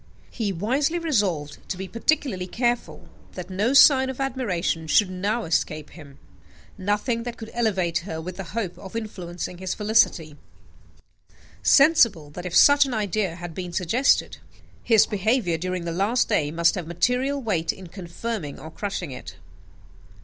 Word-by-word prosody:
He 215 -4 -2
wisely 260 - 0
resolved 200 - -1
to 185 - -3
be 190 +1 -5
particularly 230 -5 -1
careful 240 +4 -2 0.3
that 180 0 -8
no 210 +7 0
sign 265 -2 +7
of 265 - -6
admiration 205 -12 -2
should 185 +5 +3
now 205 +6 -1
escape 155 -3 -2
him 145 -5 -13 0.6
nothing 210 +5 -1
that 240 0 -6
could 225 0 -9
elevate 190 -8 0
her 170 -3 -6
with 180 +2 -7
the 195 - -5
hope 195 -6 -3
of 190 +2 -10
influencing 180 -5 -6
his 185 -1 -3
felicity; 205 -8 +1 1.2
sensible 230 - +4
that, 180 +4 -6
if 175 - -5
such 285 +4 +7
an 250 - -3
idea 205 -4 -1
had 175 -1 -8
been 180 0 -6
suggested, 205 +11 +1 0.4
his 225 -3 +5
behaviour 205 -4 0
during 180 0 -3
the 170 - -2
last 200 +8 +1
day 145 -2 +1
must 170 +2 +2
have 180 -5 -5
material 250 +11 0
weight 190 -10 -1
in 190 - -12
confirming 175 -1 -6
or 160 - -10
crushing 185 -5 -4
it. 125 - -9
190 Hz, 155 wpm, -24 LUFS, 170-235 Hz, 1.2 s, sign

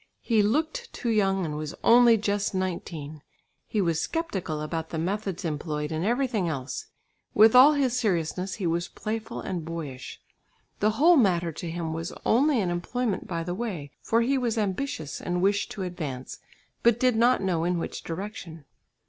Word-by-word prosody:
He 225 -3 +3
looked 315 - 0
too 235 - -2
young 195 -4 +2
and 150 -2 -4
was 150 -1 -5
only 235 -1 +7
just 205 -1 -1
nineteen; 165 -5 -4 0.5
he 210 - 0
was 165 -3 +1
sceptical 195 - -3
about 160 +1 -4
the 165 - -4
methods 190 +2 -2
employed 150 -1 -3
and 160 +1 -2
everything 230 -4 0
else; 135 -4 -4 0.5
with 220 +1 +7
all 270 +4 +9
his 265 -4 +1
seriousness 185 -2 -1
he 200 - -4
was 170 +1 0
playful 220 0 -5
and 175 -3 -4
boyish. 155 -6 -6 0.6
The 210 - +3
whole 335 +4 +6
matter 175 -8 +3
to 165 +2 -6
him 165 -1 -3
was 165 +1 -4
only 270 +3 +3
an 180 -3 -1
employment 205 +5 -2
by 165 -2 -3
the 175 +1 -3
way, 180 - -4
for 230 +1 +2
he 265 +3 +2
was 235 -2 -1
ambitious 195 - -2
and 175 0 -1
wished 200 +2 +1
to 195 - -4
advance, 150 -8 -5 0.4
but 235 -1 +4
did 255 -2 +3
not 240 -1 +3
know 175 -4 0
in 175 +1 +1
which 165 - -4
direction. 170 - -7
190 Hz, 175 wpm, -27 LUFS, 165-230 Hz, 0.6 s, all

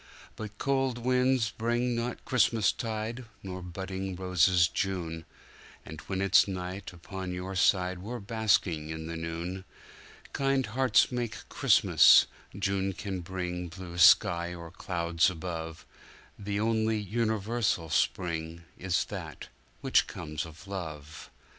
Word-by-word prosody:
But 110 -1 -8
cold 135 -2 0
winds 125 -1 +2
bring 120 +2 0
not 115 +1 -4
Christmastide, 115 0 0 0.2
nor 95 -1 -6
budding 95 +1 -5
roses 90 -1 +3
June, 85 -5 -3 0.6
And 80 0 -9
when 95 -1 -2
it's 100 - +5
night 95 0 -5
upon 95 +1 -7
your 95 +2 -5
side 90 -1 +2
we're 115 +7 -5
basking 100 -7 +1
in 80 0 -5
the 85 +1 -5
noon. 85 +3 -4 0.7
Kind 135 -1 +1
hearts 125 +3 +3
make 120 -2 -4
Christmas—June 100 0 +4
can 95 -1 -5
bring 90 0 -4
blue 85 0 -8
sky 85 0 +5
or 85 -1 -9
clouds 85 -2 +1
above; 80 -2 -6 0.5
The 100 0 -2
only 110 0 +1
universal 110 -4 -1
spring 85 -2 -1 0.2
is 90 -2 0
that - - -8 0.3
which - - +3
comes 75 +1 -5
of 80 +4 -14
love. 80 -6 -7
95 Hz, 120 wpm, -29 LUFS, 85-110 Hz, 0.7 s, it's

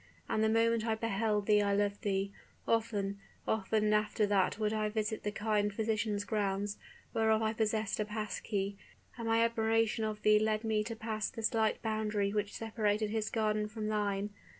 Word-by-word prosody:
And 215 - +1
the 220 - +3
moment 230 0 +3
I 225 -1 +1
beheld 215 -1 0
I 205 -1 +4
loved 205 0 0
thee. 195 -1 0 0.4
Often 205 -3 0 0.3
often 215 0 +1
after 210 0 +2
that 200 -1 +2
would 215 -1 0
I 215 -1 0
visit 215 0 -2
the 210 - -2
kind 210 -1 0
physician's 215 -1 -1
grounds, 205 -1 -1 0.3
whereof 220 0 +3
I 220 0 +1
possessed 215 -1 0
a 210 - +1
pass 210 0 -4
key; 200 -1 -2 0.4
and 230 -2 -5
my 225 0 +4
admiration 225 0 +1
of 215 -1 -3
thee 215 0 +6
led 215 0 +1
me 220 -1 +1
to 230 0 -4
pass 220 -1 -2
the 225 - -7
slight 220 -1 +1
boundary 215 -2 0
which 210 -1 -1
separated 215 -1 0
his 220 -1 -1
garden 215 -1 0
from 215 0 -4
thine. 205 -1 -1
215 Hz, 175 wpm, -33 LUFS, 205-220 Hz, 0.4 s, thee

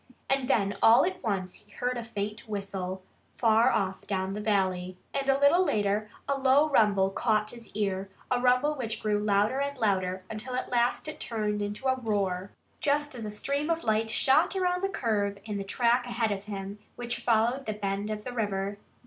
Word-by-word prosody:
And 270 -2 +1
then 200 -3 +1
all 230 +6 +7
at 375 +1 -3
once 190 -4 -2
he 210 -1 -13
heard 250 0 -2
a 240 - -3
faint 215 0 -5
whistle, 190 -2 -4 0.3
far 230 +2 +4
off 190 -1 -1
down 190 -1 -1
the 210 - -4
valley. 185 -3 0 0.2
And 275 0 -1
a 270 - +4
little 295 +6 +5
later 210 - 0 0.2
a 280 0 0
low 270 +3 +5
rumble 200 -6 +4
caught 215 0 +1
his 235 -2 -11
ear 195 -2 -1 0.2
a 250 -1 +2
rumble 250 +4 +3
which 240 -6 -3
grew 210 -1 +1
louder 210 +4 +2
and 280 0 -2
louder 190 -5 0
until 230 +4 -5
at 255 - -3
last 240 +4 +1
it 310 - -6
turned 210 -2 -2
into 205 +5 -4
a 260 - +4
roar, 200 -5 -1 0.3
just 290 0 +1
as 235 -3 -5
a - - -3
stream 280 +8 -2
of 330 0 0
light 220 0 +1
shot 265 - +3
around 360 -1 0
the 390 - +1
curve 205 - -1
in 210 -2 -3
the - - -3
track 240 +4 +1
ahead 230 -2 0
of 200 0 -3
him, 200 -1 -6 0.2
which 240 0 -3
followed 235 +3 +1
the 215 - 0
bend 200 0 -3
of 210 -1 -4
the 250 - -6
river. 200 -3 -2
215 Hz, 200 wpm, -28 LUFS, 200-250 Hz, 0.3 s, all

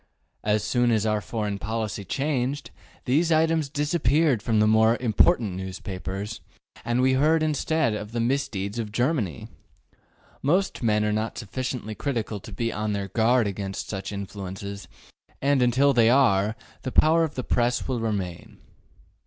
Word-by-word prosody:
As 105 0 +1
soon 120 +2 +2
as 110 -2 +2
our 105 -1 +1
foreign 105 -3 -3
policy 110 -1 -3
changed, 140 +2 -2 0.3
these 155 +6 +2
items 160 -2 +2
disappeared 145 -3 +1
from 110 -1 +1
the 105 - +5
more 110 +2 +4
important 115 - +3
newspapers, 95 +2 -5 0.4
and 120 +1 0
we 130 0 +4
heard 155 +4 +3
instead 155 -3 +1
of 105 0 -5
the 120 - -2
misdeeds 115 -4 -1
of 110 -2 -4
Germany. 120 - -1 0.9
Most 180 +6 +1
men 105 -3 +2
are 105 - +1
not 110 +1 -2
sufficiently 120 0 -4
critical 115 -4 -3
to 105 - -11
be 115 +4 -2
on 105 +1 -2
their 100 -1 -3
guard 120 +1 +3
against 95 -1 -4
such 95 -1 -4
influences, 100 0 -6 0.5
and 140 -1 +2
until 130 +3 +4
they 115 -2 +5
are, 110 -5 +3 0.3
the 130 - -4
power 160 +4 +4
of 155 -3 -3
the 130 - -3
Press 120 0 0
will 130 -3 -1
remain. 100 -6 -4
115 Hz, 155 wpm, -25 LUFS, 105-135 Hz, 0.9 s, the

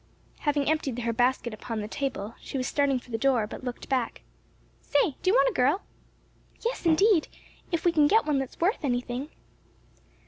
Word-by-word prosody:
Having 290 -2 0
emptied 300 -6 0
her 235 -1 -1
basket 245 0 +1
upon 220 +1 -5
the 210 - -4
table, 230 -4 -3
she - - -5
was 255 - -1
starting 280 -1 +1
for 245 0 -11
the 225 - -2
door, 250 -3 +3
but 210 - -9
looked 245 -1 -6
back. 255 -3 -1 0.6
"Say, 420 -11 +2
do 370 - +2
you 405 - +4
want - - +5
a - - -10
girl?" 280 +10 +2 0.8
"Yes, 470 -7 -1
indeed, 335 +1 +4 0.4
if 335 -1 -1
we 345 - +5
can 300 -3 +4
get 440 +8 +4
one 295 -3 +1
that's 265 -1 -6
worth 360 +2 +1
anything." 245 +1 -2
275 Hz, 185 wpm, -27 LUFS, 245-315 Hz, 0.8 s, want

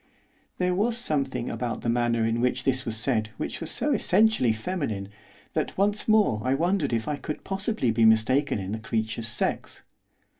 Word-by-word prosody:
There 180 0 +1
was 225 +5 +1
something 140 - 0
about 120 -1 -3
the - - -4
manner 115 -1 +1
in 115 +1 0
which 125 0 0
this 130 -1 0
was 110 -1 -3
said 110 -2 0
which - - -4
was 165 - -4
so 295 - 0
essentially 215 - +3
feminine 110 - -3 0.4
that - - -2
once 205 +2 +1
more 210 - +3
I 130 +2 +1
wondered 170 0 0
if 115 -2 -1
I 150 - -1
could 150 - -6
possibly 195 - -1
be 115 +1 +2
mistaken 110 +6 +3
in 95 -1 -5
the 110 - -3
creature's 110 +1 -2
sex. 110 - -1
130 Hz, 180 wpm, -26 LUFS, 115-180 Hz, 0.4 s, essentially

